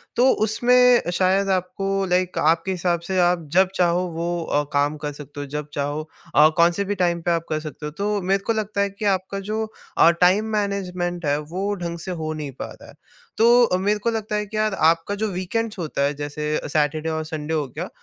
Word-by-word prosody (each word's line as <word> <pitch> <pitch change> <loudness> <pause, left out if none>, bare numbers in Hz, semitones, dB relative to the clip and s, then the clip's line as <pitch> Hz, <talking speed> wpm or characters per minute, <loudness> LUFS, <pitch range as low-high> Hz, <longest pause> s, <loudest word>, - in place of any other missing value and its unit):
तो 250 +2 +5 0.2
उसमें 245 -1 +4
शायद 190 +2 +2
आपको 195 +1 -1
लाइक 180 0 +1
आपके 165 +4 +2
हिसाब 175 -1 0
से 190 - -1
आप 175 -2 +2
जब 185 +1 +5
चाहो 180 0 +2
वो 170 +1 -2
अ, 145 -2 0
काम 145 +2 +1
कर 150 -1 -4
सकते 145 0 -10
हो, 145 - -4
जब 150 +1 -5
चाहो 145 +2 -3 0.3
और 150 +2 +7
कौन-से 170 +3 +3
भी 205 +1 -2
टाइम 175 -2 0
पर 170 - 0
आप 165 -1 0
कर 155 -1 0
सकते 155 -1 -8
हो। 150 - -4
तो 205 0 -1
मेरे 195 +2 0
को 230 - +3
लगता 210 -2 -2
है 200 - +1
कि 200 +2 -7
आपका 190 +2 -6
जो 220 +1 0 0.3
अ, - - +7
टाइम 180 +5 +3
मैनेजमेंट 180 -4 -2
है, 145 0 +2
वो 185 +7 -3
ढंग 170 -2 -5
से 185 +3 -6
हो 160 -3 -3
नहीं 150 -3 -5
पा - - -5
रहा - - -15
है। - - -13 0.4
तो 235 +2 +6
अ, 180 -6 +2
मेरे 205 +3 0
को 235 - 0
लगता 220 -1 -3
है 210 0 -1
कि 215 +1 -6
यार 215 -1 +1 0.2
आपका 165 +5 -3
जो - - +2
वीकेंड्स 205 +4 -3
होता 155 -4 -3
है, 140 +1 +1
जैसे 145 +1 -4 0.2
सैटरडे 155 +1 0
और 160 0 -2
संडे 155 0 -4
हो 150 -3 0
गया, 125 - -6
180 Hz, 225 wpm, -22 LUFS, 155-200 Hz, 0.4 s, और